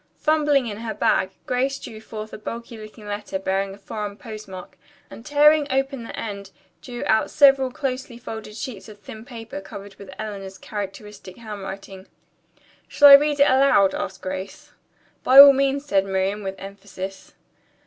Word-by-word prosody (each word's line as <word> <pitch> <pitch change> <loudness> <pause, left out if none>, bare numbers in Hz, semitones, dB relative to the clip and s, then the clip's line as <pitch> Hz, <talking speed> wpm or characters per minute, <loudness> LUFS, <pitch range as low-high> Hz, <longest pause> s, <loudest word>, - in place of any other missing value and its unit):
Fumbling 300 -4 +2
in 210 -3 -5
her 225 -1 -5
bag, 190 -2 +1 0.2
Grace 265 +2 -1
drew 220 -5 -10
forth 215 -1 -9
a - - -6
bulky 230 +2 -7
looking 215 0 -12
letter, 205 -1 -4
bearing 195 +1 -2
a - - -18
foreign 205 -1 -6
postmark, 215 -6 -10 0.4
and 225 - -11
tearing 295 +1 +4
open 270 0 -1
the 230 - -8
end, 200 -3 -6 0.3
drew 240 -2 -7
out 220 - +2
several 275 -3 +5
closely 255 -2 -5
folded 220 -3 -8
sheets 220 -5 -7
of 210 - -13
thin 215 +2 -11
paper 225 -4 -9
covered 195 +1 -10
with 200 -1 -12
Eleanor's 195 -3 -7
characteristic 205 -1 -8
handwriting. 195 -3 -9 0.8
"Shall 290 -1 +6
I - - +11
read 290 +1 +6
it 280 - +6
aloud?" 260 -7 +4
asked - - -5
Grace. 190 +1 -7 0.5
"By 260 - +4
all 280 0 +12
means," 275 +1 0
said 195 -7 +1
Miriam 195 +2 -1
with 195 -1 -5
emphasis. 195 -1 -9
215 Hz, 160 wpm, -22 LUFS, 195-265 Hz, 0.8 s, all